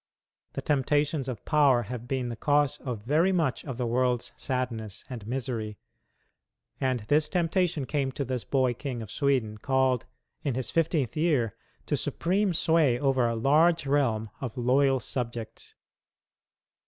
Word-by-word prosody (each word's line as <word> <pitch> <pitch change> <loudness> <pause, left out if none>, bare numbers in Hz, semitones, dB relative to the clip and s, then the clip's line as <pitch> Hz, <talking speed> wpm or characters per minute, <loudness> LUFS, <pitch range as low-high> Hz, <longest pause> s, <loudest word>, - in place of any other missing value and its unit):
The - - -4
temptations 145 0 +1
of 120 -6 -6
power 140 -5 +4
have 120 +2 -7
been 130 -2 -1
the 115 - -4
cause 145 +3 +1
of 120 -6 -5
very 155 - +3
much 165 -8 0
of 130 -5 -6
the 125 - -1
world's 125 0 0
sadness 115 -6 -3
and 115 -5 -7
misery. 115 -4 -3 1.0
And 130 -3 0
this 150 +8 +2
temptation 175 -4 +1
came 135 -1 -1
to 140 - -3
this 125 -2 -3
boy 130 -3 +1
King 125 -2 -5
of 110 - -10
Sweden 130 -7 0
called 130 -1 +1 0.3
in 140 -5 -1
his 130 -1 -2
fifteenth 160 -5 +1
year 150 - +1 0.3
to - - 0
supreme 190 +3 0
sway 160 -6 +3
over 135 -3 +2
a 115 - -1
large 155 +7 +3
realm 115 -6 +1
of 125 -4 -5
loyal 135 +2 +3
subjects. 115 -2 -5
130 Hz, 150 wpm, -28 LUFS, 120-145 Hz, 1.0 s, power